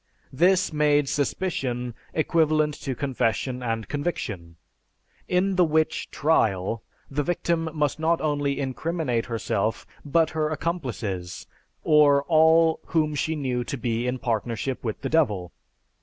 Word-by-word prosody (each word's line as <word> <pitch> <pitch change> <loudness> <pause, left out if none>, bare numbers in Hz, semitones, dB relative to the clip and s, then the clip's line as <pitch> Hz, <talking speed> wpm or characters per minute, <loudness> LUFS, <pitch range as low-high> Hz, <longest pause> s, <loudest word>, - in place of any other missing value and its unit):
This 180 +4 +3
made 150 -1 +3
suspicion 130 -5 -2 0.2
equivalent 155 -1 +2
to 135 -2 -3
confession 130 -1 -1
and 115 -2 -2
conviction. 105 - -4 0.7
In 185 +1 +1
the 180 - +6
witch 155 -1 0
"trial" 115 - +1 0.3
the 145 +2 0
victim 165 0 -1
must 150 -1 -1
not 165 +1 +2
only 145 -2 -1
incriminate 135 -2 -2
herself 115 -2 -1 0.2
but 160 +2 +2
her 155 -1 0
accomplices, 120 - -4 0.4
or 145 -2 +5
all 160 +1 +4
whom 155 -2 +1
she 160 +3 -1
"knew" 130 -4 -1
to 140 - -4
be 120 0 -1
in 125 +1 -1
partnership 120 +2 -2
with 110 -3 -4
the - - -3
Devil. 105 - +1
145 Hz, 125 wpm, -25 LUFS, 120-160 Hz, 0.7 s, the